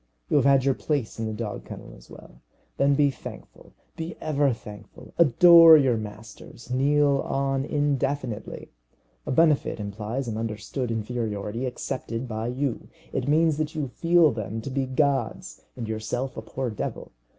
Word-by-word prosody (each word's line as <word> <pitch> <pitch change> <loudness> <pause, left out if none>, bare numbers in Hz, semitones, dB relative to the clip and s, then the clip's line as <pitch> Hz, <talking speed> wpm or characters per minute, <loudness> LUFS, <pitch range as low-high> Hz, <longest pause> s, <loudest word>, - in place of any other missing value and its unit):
You - - +4
have - - +3
had 135 -1 +4
your 135 - +3
place 135 -6 -3
in 110 - -2
the - - -3
dog 110 -1 -5
kennel - - -10
as - - -18
well. - - -15 0.4
Then 140 0 +3
be 145 -1 +3
thankful - - -12 0.2
be 165 +1 -6
ever 145 -3 +1
thankful. 105 -3 -11
Adore 165 +2 +8
your 135 -5 +3
masters. 110 +3 -9
Kneel 140 +2 +3
on 135 0 -1
indefinitely. 140 -6 -2 0.6
A - - -1
benefit 155 -4 +2
implies 105 +5 -4
an 110 -2 -3
understood 115 +3 -4
inferiority 115 0 -3
accepted 125 -1 -5
by 110 0 -4
you. 130 0 -3 0.3
It 130 - -2
means 155 +1 +3
that 155 +1 -3
you 145 -4 -2
feel 165 +3 +3
them 110 -1 -5
to 135 - -6
be 135 0 -1
gods 135 -2 -1
and 120 -3 -5
yourself 110 +4 -3
a - - -5
poor 125 +2 -4
devil. 105 - -5
130 Hz, 160 wpm, -25 LUFS, 110-145 Hz, 0.6 s, Adore